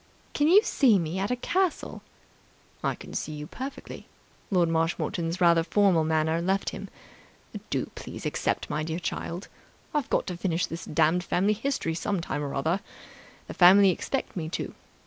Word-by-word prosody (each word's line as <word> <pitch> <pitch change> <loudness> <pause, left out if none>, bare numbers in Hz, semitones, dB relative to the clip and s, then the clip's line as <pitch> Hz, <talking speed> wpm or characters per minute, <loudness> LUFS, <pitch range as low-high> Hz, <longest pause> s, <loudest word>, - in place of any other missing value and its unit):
"Can 295 - +2
you 395 +6 +7
see 250 - +4
me 170 +1 -2
at 195 - -1
a 250 - +1
castle?" 365 +7 -1 0.8
"I - - 0
can - - -11
see 155 - -3
you 150 0 -6
perfectly." 265 - -8 0.4
Lord 180 -4 +3
Marshmoreton's 165 +1 -1
rather 170 -2 +5
formal 185 -1 +3
manner 160 +1 +1
left 190 +3 0
him. - - -7 0.8
"Do - - 0
please - - -8
accept, - - -1
my 150 - -2
dear 160 +1 -3
child. 175 +1 -4 0.5
I've 295 -4 -1
got - - +1
to 180 - -5
finish 175 -1 0
this 165 - -7
damned 165 +3 +2
family 195 +4 +2
history 225 -7 -2
some 195 +3 -1
time 155 -3 -3
or 140 -1 -4
other. 160 +7 0 0.7
The - - -8
family 190 +2 +7
expect 270 +9 -3
me 160 -4 -3
to. - - -4
175 Hz, 165 wpm, -27 LUFS, 165-205 Hz, 0.8 s, you